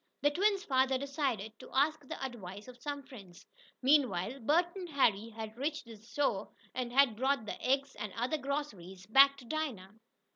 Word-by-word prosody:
The 290 - +5
twins' 395 +4 +2
father 265 -2 +2
decided 270 -7 -2
to - - -11
ask 300 +3 +3
the - - -6
advice 205 -5 -8
of 250 -1 -13
some 285 +1 -4
friends. 200 -10 -13 0.4
Meanwhile 255 -5 +3
Bert 340 - +2
and 365 -3 -6
Harry 230 -7 +2
had 220 -1 -7
reached 290 +2 -3
the 230 -1 -10
store, 220 -2 -1 0.2
and 250 -2 -3
had 260 -3 +5
brought 265 0 +1
the - - -6
eggs, 275 +1 +1
and 210 - -5
other 255 +7 -1
groceries, 205 -11 -4
back 275 +6 +7
to 260 - -13
Dinah. 240 -10 -3
260 Hz, 175 wpm, -33 LUFS, 220-285 Hz, 0.4 s, back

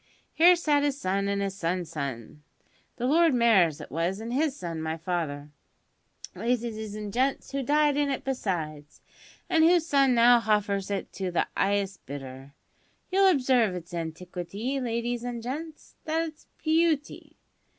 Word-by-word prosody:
Here 345 +3 +7
sat 300 -4 +2
his 285 -1 -1
son, 195 -1 -1
and 200 0 0
his 195 -1 -3
son's 175 -2 -2
son 140 -3 -6 0.5
the 245 - -3
Lord 320 +1 +4
Mayor 230 -7 +5
as 155 -1 -8
was 170 +5 -1
and 230 +2 -5
his 285 +1 +1
son, 165 - -5
my 160 0 -3
father, 155 -4 -3 0.8
ladies 225 -3 -2
and 210 -1 -6
gents, 265 +3 0
who 275 0 -2
died 295 +2 +2
in 290 0 +1
it 270 - -2
besides, 160 - -4 0.5
and 320 -1 +3
whose 340 0 +4
son 275 -5 +3
now 240 +1 +6
hoffers 205 -3 0
it 200 -1 -4
to 190 -1 -3
the 175 - +1
'ighest 195 -1 0
bidder. 135 0 -9 0.6
You'll 390 +1 +5
observe 255 - +2
its 175 0 -8
antiquity, 180 - -4
ladies 240 -1 -2
an' 245 -1 -4
gents. 300 +7 -7
That's 320 0 -3
its - - -43
beauty. 315 -2 0
225 Hz, 155 wpm, -27 LUFS, 175-275 Hz, 0.8 s, Here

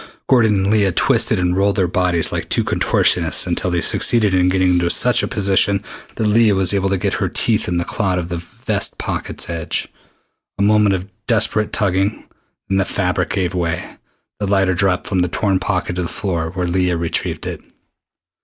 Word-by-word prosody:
Gordon 115 -5 +3
and 95 +1 0
Leah 105 -3 +2
twisted - - +2
and 90 0 0
rolled 100 +1 +1
their 95 -3 +1
bodies 90 -2 +1
like - - -4
two - - +1
contortionists - - +1
until - - 0
they 85 -1 0
succeeded 110 -5 +1
in 90 0 +3
getting 95 0 +2
into 85 -1 +1
such 125 +7 +4
a - - -2
position 100 -1 +2 0.3
that 110 - -2
Leah 105 -1 +3
was 95 0 +2
able 95 -1 0
to 95 - +1
get - - -1
her - - -1
teeth 110 -2 0
in 90 - -1
the 85 - -1
cloth 95 -5 -1
of 85 -1 -4
the 85 - -3
vest 85 - -2
pocket's - - -3
edge. 85 -1 -2 0.7
A 100 - 0
moment 105 -1 +3
of 95 +1 -5 0.2
desperate 110 -2 +1
tugging, 100 +1 -1 0.4
then 95 0 0
the - - +3
fabric 90 -2 -1
gave 95 -3 -1
way. 85 -3 -3 0.4
The 100 - -2
lighter 95 -1 +2
dropped 90 0 0
from 95 - -1
the 90 - +2
torn 95 +1 0
pocket 90 -2 -2
to - - -1
the 85 - -3
floor, 85 -5 -3
where 90 +1 -3
Leah 90 0 0
retrieved 85 -1 -3
it. - - -5
95 Hz, 195 wpm, -18 LUFS, 90-100 Hz, 0.7 s, such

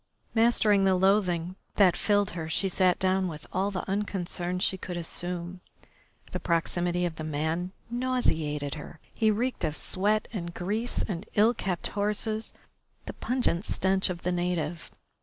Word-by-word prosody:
Mastering 220 -3 +4
the 190 -1 +4
loathing 185 -2 +2 0.2
that 190 -4 +5
filled 205 -2 +2
her 165 -2 -5
she 195 +4 +1
sat 185 0 +3
down 190 0 +2
with 155 -3 -7
all 195 +2 +1
the 195 -2 -4
unconcern 185 -3 -2
she 185 - +2
could 180 -1 -5
assume. 175 +1 -3 0.7
The - - -2
proximity 175 +1 0
of 165 -2 -3
the 155 - -4
man 160 +4 -1 0.2
nauseated 165 - 0
her. 155 0 -9
He 220 -2 +2
reeked 240 +5 0
of 155 - 0
sweat 210 +3 +1
and 170 -5 -4
grease 215 +7 -1
and 195 +1 -4
ill 220 +3 +5
kept 185 -6 -2
horses, 210 +2 0 0.5
the - - -5
pungent 245 -8 0
stench 190 -1 +1
of 175 -1 -5
the 180 - +1
native. 175 -2 -2
185 Hz, 155 wpm, -28 LUFS, 170-205 Hz, 0.7 s, that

